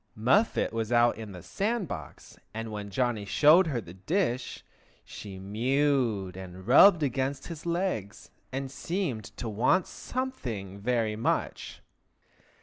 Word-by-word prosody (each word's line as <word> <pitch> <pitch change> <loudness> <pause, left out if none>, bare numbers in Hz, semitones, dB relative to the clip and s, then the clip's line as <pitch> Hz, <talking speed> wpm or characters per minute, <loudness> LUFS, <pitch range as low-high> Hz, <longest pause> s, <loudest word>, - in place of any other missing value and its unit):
Muffet 130 - +2
was 115 0 -2
out 120 0 +4
in 110 -2 -8
the 90 -3 -10
sand 215 -1 -1
box, 80 - -9 0.2
and 115 0 -4
when 105 -1 -5
Johnny 120 +1 0
showed 155 - +5
her 135 -6 -1
the 90 -6 -10
dish 130 - -2 0.4
she 100 -3 -9
mewed 115 -1 0
and 95 0 -9
rubbed 160 - +7
against 135 0 -1
his 170 0 -7
legs, 170 - -2 0.2
and 135 0 -4
seemed 140 - -3
to 120 - -4
want 120 - +2
something 120 - -5
very 115 -1 0
much. 110 - -2
120 Hz, 135 wpm, -28 LUFS, 105-150 Hz, 0.4 s, rubbed